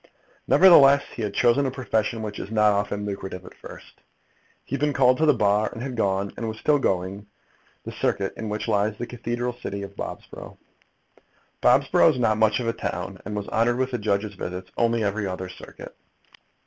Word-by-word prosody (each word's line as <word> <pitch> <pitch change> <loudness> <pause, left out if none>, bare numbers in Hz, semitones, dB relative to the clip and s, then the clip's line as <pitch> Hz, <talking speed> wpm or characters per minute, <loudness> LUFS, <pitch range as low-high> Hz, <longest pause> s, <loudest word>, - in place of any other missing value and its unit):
Nevertheless, 140 -7 +7
he - - -6
had 105 -2 -3
chosen 125 +3 +3
a - - 0
profession 115 -3 -2
which 105 -1 -6
is - - -6
not 105 -1 +3
often 105 0 -2
lucrative 95 -2 -6
at - - -12
first. - - -14 0.6
He - - -9
had - - 0
been 150 0 +1
called 130 -1 +4
to 160 - +3
the 150 - +6
Bar, 105 -1 +2
and 115 - -7
had 130 -2 -5
gone, 100 -2 -1
and 115 - -4
was 110 0 -5
still 145 +4 +2
going, 95 -1 -2 0.6
the - - -5
circuit 95 -1 -1
in 110 - -5
which 105 +1 -4
lies 105 +1 0
the 120 - -4
cathedral 120 +1 -4
city 100 -4 -6
of 100 0 -9
Bobsborough. - - -8 1.0
Bobsborough - - +4
is - - -4
not 110 -3 +1
much 110 +1 +3
of 120 - -3
a 115 - +1
town, - - -5
and 105 - -5
was 105 -1 -4
honoured 120 +2 +1
with 130 0 -1
the 125 - -2
judges' 105 0 -1
visits 90 0 -7
only 115 -1 +1
every 100 0 -1
other 95 0 -5
circuit. 90 - -12
110 Hz, 200 wpm, -24 LUFS, 100-120 Hz, 1.0 s, Nevertheless